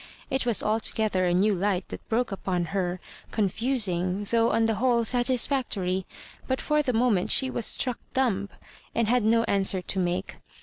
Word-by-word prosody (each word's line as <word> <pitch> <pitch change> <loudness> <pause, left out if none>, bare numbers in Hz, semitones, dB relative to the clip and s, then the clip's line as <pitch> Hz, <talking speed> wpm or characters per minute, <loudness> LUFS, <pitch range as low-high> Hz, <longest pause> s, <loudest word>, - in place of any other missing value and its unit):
It 265 -2 +1
was 235 - +2
alto 215 +1 +1
gether 205 -4 0
a 175 - +1
new 205 +3 +3
light 190 0 -1
that - - -10
broke 230 0 0
upon 185 -2 -2
her, 185 -2 -1 0.3
con 210 -3 0
fusing 200 -5 0
though 230 0 +3
on 225 0 +2
the 225 - +1
whole 240 -3 +2
satisfactory; 240 -7 +1 0.4
but 260 0 -1
for 300 0 +1
the 265 - -1
moment 225 -5 +1
she 260 -1 +3
was 235 - 0
struck 250 -3 +1 0.2
dumb, 205 -7 0 0.5
and 230 -2 +1
had 245 0 +2
no 230 +1 +3
answer 195 -3 +1
to 190 +1 -2
make. 175 0 -2
220 Hz, 180 wpm, -26 LUFS, 190-245 Hz, 0.5 s, new